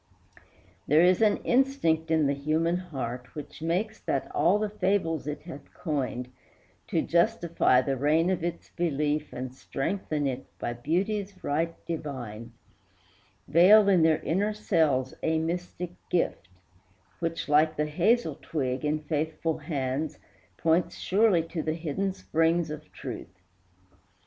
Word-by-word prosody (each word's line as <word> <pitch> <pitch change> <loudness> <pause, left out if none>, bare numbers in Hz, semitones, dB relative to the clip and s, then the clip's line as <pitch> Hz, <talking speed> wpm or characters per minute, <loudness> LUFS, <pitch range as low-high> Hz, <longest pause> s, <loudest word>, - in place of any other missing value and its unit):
There 155 +4 +5
is 180 +3 +4
an 215 -2 +4
instinct 240 - +2
in 160 -2 +3
the 140 - +2
human 155 +4 0
heart 125 -8 -6
Which 150 0 -8
makes 185 +7 -1
that 135 - -2
all 170 +7 +4
the 215 0 0
fables 185 -7 0
it 150 0 -4
hath 150 -4 -10
coined, 130 -6 -3 0.6
To - - 0
justify 170 - +3
the 135 0 0
reign 155 +6 +3
of 180 -3 -1
its 170 0 -4
belief 150 -2 -1
And 125 0 -5
strengthen 150 +2 -2
it 130 -2 -3
by 120 - -3
beauty's 190 - -2
right 165 +3 0
divine, 130 -9 -5 1.0
Veil 195 +7 +7
in 190 -4 +5
their 160 -1 +4
inner 205 +6 0
cells 155 -11 +1
a 160 0 +1
mystic 175 +2 -3 0.2
gift, 170 - 0 0.7
Which, 165 0 -2
like 155 +1 +4
the 150 - +1
hazel 170 - +1
twig, 130 -4 -2
in 150 +1 0
faithful 155 +1 -2
hands, 140 -1 -2 0.4
Points 170 +2 +2
surely 195 -3 +3
to 165 - -3
the 155 +1 -1
hidden 170 +4 -2
springs 165 -2 +1
of 155 0 -8
truth. 95 +3 -8
160 Hz, 135 wpm, -28 LUFS, 145-180 Hz, 1.0 s, Veil